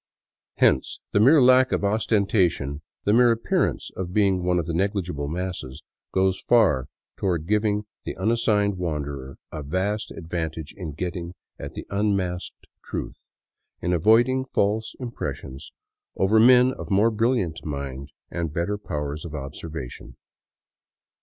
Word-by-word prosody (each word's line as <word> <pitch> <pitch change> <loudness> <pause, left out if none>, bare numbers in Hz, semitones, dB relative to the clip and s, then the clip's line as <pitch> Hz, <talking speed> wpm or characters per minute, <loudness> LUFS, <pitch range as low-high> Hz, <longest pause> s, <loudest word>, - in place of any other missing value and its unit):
Hence 65 - +2
the - - +3
mere 140 +9 +7
lack 130 0 +6
of - - 0
ostentation, 100 - +1 0.2
the 105 - +2
mere 120 +1 +6
appearance 115 0 0
of 90 -1 -5
being 100 -3 +3
one 90 0 +2
of 85 - 0
the 85 - -3
negligible 90 -5 -1
masses, 85 -4 -5 0.3
goes 95 0 +1
far 95 - +3 0.3
toward 85 -5 -1
giving 105 +1 +1 0.2
the - - -5
unassigned 105 -4 +1
wan 80 -5 -1
derer 70 -1 -7 0.2
a 75 - -5
vast 95 +8 -2
advantage 80 -2 -5
in 85 -6 -6
getting 85 +2 -4 0.2
at - - -7
the - - -6
unmasked 100 -3 -1 0.2
truth, - - -6 0.5
in 90 - -1
avoid 110 +8 +5
ing 130 0 0
false 110 -3 -1
impressions, 75 - -6 0.4
over 105 +3 +3
men 125 +2 +6
of - - -8
more 105 +3 +4
brilliant 110 -7 0
mind 70 -2 -5 0.2
and 85 -3 -2
better 85 +6 -2
pow 75 -7 -3
ers 75 +1 -5
of 80 -3 -7
observation. 75 -1 -7
95 Hz, 140 wpm, -24 LUFS, 80-105 Hz, 0.5 s, mere